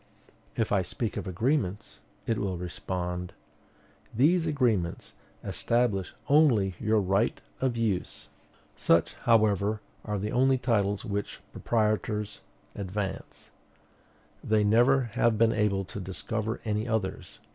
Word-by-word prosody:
If 110 - -1
I 100 -2 +3
speak 110 +5 -3
of - - -4
agreements, 105 - -1 0.3
it 115 - 0
will 95 -3 -2
respond, 90 +1 -4 0.8
"These 160 +8 +3
agreements 115 - 0 0.3
establish 115 -6 0
only 130 -11 +4
your 110 0 +2
right 100 +3 +1 0.2
of 130 -3 0
use." 105 -6 -2 0.5
Such, - - +2
however, 105 -2 +2 0.2
are 105 -1 -2
the 105 +2 -3
only 130 +1 +3
titles 105 -5 0
which 100 0 -3
proprietors 105 -2 -1 0.3
advance. 100 0 -5 0.9
They 110 -1 +2
never 120 +6 +4
have 115 -2 +2
been 115 +1 +4
able 105 -3 +1
to 100 - -7
discover 110 +4 -4
any 105 +1 -1
others. 110 -4 -3
105 Hz, 115 wpm, -28 LUFS, 95-115 Hz, 0.9 s, only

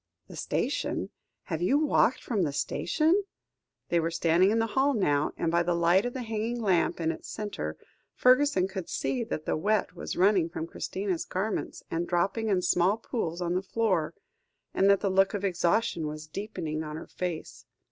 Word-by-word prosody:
"The - - -11
station? - - -2 0.3
Have 165 -2 -4
you 260 +11 +3
walked 290 -4 +2
from 220 -5 -1
the 150 -5 0
station?" 325 - +1 0.7
They 170 - +3
were 165 0 0
standing 170 +3 +3
in 220 - +2
the 225 - +2
hall 275 +1 +3
now, 145 -8 +1
and 165 - 0
by 170 0 +3
the 175 0 0
light 175 +6 +3
of 245 - -6
a 255 - -3
hanging 225 +1 -2
lamp 190 -7 +1
in 165 -1 +1
its 165 - -9
centre, 140 - -4 0.4
Fergusson 255 -7 +4
could 190 -3 -6
see 250 -3 -1
that 155 -9 -4
the - - 0
wet 205 +6 0
was - - -5
running 185 -3 +4
from 165 -1 -4
Christina's 185 +1 -3
garments, 195 +3 -3
and 170 +1 -1
dropping 195 +6 0
in 185 -3 +2
small 180 +5 +3
pools 180 -8 -3
on 175 0 -1
the 185 - +1
floor, 190 -6 0 0.6
and 195 - +3
that 200 -1 +4
the 195 - +1
look 195 +1 +3
of 200 0 -2
exhaustion 175 -1 +1
was 155 0 -6
deepening 160 -3 -4
on 150 -1 -6
her 160 - -7
face. 175 -3 -5
185 Hz, 190 wpm, -28 LUFS, 170-220 Hz, 0.7 s, Fergusson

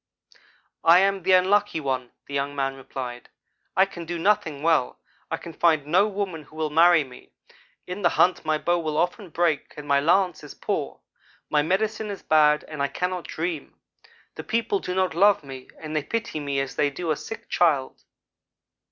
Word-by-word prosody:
"'I 165 +1 +7
am 195 0 +1
the 185 +2 +3
Unlucky 190 0 +3
one, 130 -4 -2
' - - -42
the 140 - -9
young 140 +1 -2
man 135 -1 -1
replied. 125 -2 -7 0.5
'I 190 - +6
can 175 -3 -9
do 175 +1 -4
nothing 165 -6 +1
well. 160 -6 +2 0.3
I - - -2
can 170 - -10
find 160 -3 +2
no 185 +7 +3
woman 195 -5 -4
who 155 - -18
will 155 -1 -2
marry 165 0 +6
me. 125 -2 -15 0.5
In 180 +3 -6
the 175 - +4
hunt 180 +2 +2
my 155 -1 +1
bow 175 +3 0
will 155 -2 -3
often 180 +3 -1
break 165 -2 -1
or 150 - -6
my 140 -1 +2
lance 175 +2 +2
is 150 - -10
poor. - - -3 0.5
My 150 - +4
medicine 215 +6 -1
is 200 - -7
bad 150 -1 +4
and 150 -2 -6
I 140 - +2
cannot 180 +5 -3
dream. 165 -2 -5 0.5
The - - -8
people 235 - 0
do 180 - -4
not 185 -3 +1
love 200 +1 +4
me, 135 -2 -10
and 155 -1 -6
they 155 - +2
pity 225 0 -3
me 140 -1 -2
as 135 -1 -6
they 145 - +3
do 160 +4 -3
a - - +2
sick 225 - -8
child.' 150 -7 +1
165 Hz, 195 wpm, -25 LUFS, 145-185 Hz, 0.5 s, I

